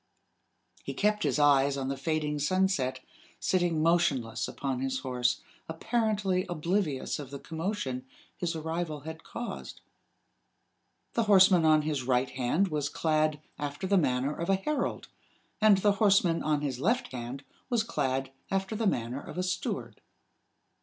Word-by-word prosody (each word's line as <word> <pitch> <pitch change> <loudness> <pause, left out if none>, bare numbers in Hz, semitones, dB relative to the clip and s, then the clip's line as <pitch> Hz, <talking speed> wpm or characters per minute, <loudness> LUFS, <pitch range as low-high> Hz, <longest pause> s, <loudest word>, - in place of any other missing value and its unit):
He - - -5
kept 210 0 +1
his 145 -3 +1
eyes 140 -1 +4
on 135 -1 -2
the 135 - -1
fading 150 +1 -1
sunset, 145 -6 +1 0.4
sitting 175 -4 +1
motionless 135 -9 +1
upon 135 -2 -3
his 130 0 -2
horse, 125 -1 0 0.3
apparently 205 0 0
oblivious 170 -4 -1
of 140 -3 -7
the 140 - -6
commotion 160 -5 -3 0.3
his 170 -1 -2
arrival 160 -1 -3
had 160 +2 -8
caused. 240 - -6 1.3
The 230 - +1
horseman 190 -4 +6
on 155 -1 +5
his 150 -3 -1
right 125 0 +1
hand 135 +10 +1
was 150 -2 -1
clad 155 -1 +1 0.2
after 145 +5 -4
the 200 +1 +2
manner 135 -4 +2
of 170 - -4
a 195 - +5
herald, 280 +9 -2 0.5
and 215 -2 +7
the 205 +2 +3
horseman 195 -5 +4
on 150 -1 +1
his 135 -4 -2
left 235 - +1
hand 125 +2 -6 0.3
was 235 -3 +2
clad 135 - -1 0.2
after 195 +2 -1
the 220 0 0
manner 125 -3 -1
of - - -9
a 180 - 0
steward. 180 0 -3
155 Hz, 145 wpm, -29 LUFS, 135-190 Hz, 1.3 s, and